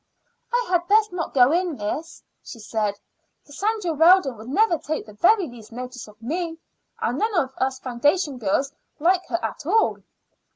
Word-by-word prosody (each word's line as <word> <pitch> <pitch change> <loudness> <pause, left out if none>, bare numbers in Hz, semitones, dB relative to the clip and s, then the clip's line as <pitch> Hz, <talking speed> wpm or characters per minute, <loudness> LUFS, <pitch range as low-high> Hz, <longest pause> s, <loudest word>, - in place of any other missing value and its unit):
"I 485 0 +1
had 350 -1 +1
best 425 +1 +4
not 335 -5 -4
go 255 +1 +6
in, 350 -1 +1
miss," 275 +10 -5 0.2
she - - -10
said. 215 -2 -2 0.5
"Cassandra 390 +3 -2
Weldon 325 -3 +5
would 220 +3 -10
never 345 +2 +3
take 310 +3 -4
the 215 - -13
very 375 - +4
least 240 -4 -13
notice 250 0 -7
of 210 +1 -17
me; 325 +7 -3 0.4
and - - -1
none 435 -1 0
of 265 -5 +1
us 260 0 0
foundation 270 +3 0
girls 255 +7 0 0.3
like 360 +4 +3
her 340 - 0
at - - -5
all." 450 - +3
295 Hz, 170 wpm, -23 LUFS, 245-360 Hz, 0.5 s, go